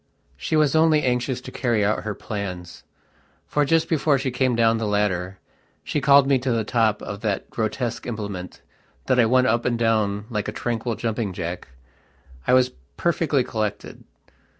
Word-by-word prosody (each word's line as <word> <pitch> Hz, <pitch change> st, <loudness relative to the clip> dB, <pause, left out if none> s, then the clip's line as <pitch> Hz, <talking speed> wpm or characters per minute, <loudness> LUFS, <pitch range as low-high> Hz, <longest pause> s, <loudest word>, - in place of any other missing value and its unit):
She -, -, -2 dB
was 155 Hz, -1 st, +3 dB
only 160 Hz, -1 st, +4 dB
anxious 125 Hz, 0 st, 0 dB
to -, -, -9 dB
carry 115 Hz, -6 st, 0 dB
out 105 Hz, +2 st, +1 dB
her 105 Hz, -1 st, -3 dB
plans. 90 Hz, -4 st, -6 dB, 0.6 s
For, 150 Hz, -, +1 dB
just 165 Hz, +3 st, +2 dB
before 150 Hz, -3 st, +2 dB
she 130 Hz, 0 st, -2 dB
came 125 Hz, 0 st, +1 dB
down 115 Hz, -1 st, +3 dB
the 110 Hz, -, -2 dB
ladder, 95 Hz, -3 st, -1 dB, 0.5 s
she 150 Hz, -, -2 dB
called 140 Hz, 0 st, +6 dB
me 135 Hz, -1 st, +3 dB
to 125 Hz, 0 st, -1 dB
the 115 Hz, -1 st, +1 dB
top 110 Hz, -1 st, +1 dB
of 100 Hz, 0 st, -6 dB
that 105 Hz, -4 st, -2 dB
grotesque 115 Hz, +2 st, -3 dB
implement 100 Hz, -6 st, -6 dB, 0.4 s
that 130 Hz, -1 st, +2 dB
I 115 Hz, -, +5 dB
went 130 Hz, +2 st, +4 dB
up 115 Hz, 0 st, +2 dB
and 120 Hz, -1 st, 0 dB
down 105 Hz, -3 st, +1 dB
like 105 Hz, -2 st, -2 dB
a -, -, -2 dB
tranquil 115 Hz, +1 st, -2 dB
jumping 110 Hz, -3 st, -2 dB
jack. 85 Hz, 0 st, -5 dB, 0.8 s
I -, -, +4 dB
was 130 Hz, 0 st, +3 dB, 0.3 s
perfectly 160 Hz, -5 st, +1 dB
collected. 110 Hz, -3 st, -4 dB
115 Hz, 175 wpm, -23 LUFS, 105-130 Hz, 0.8 s, called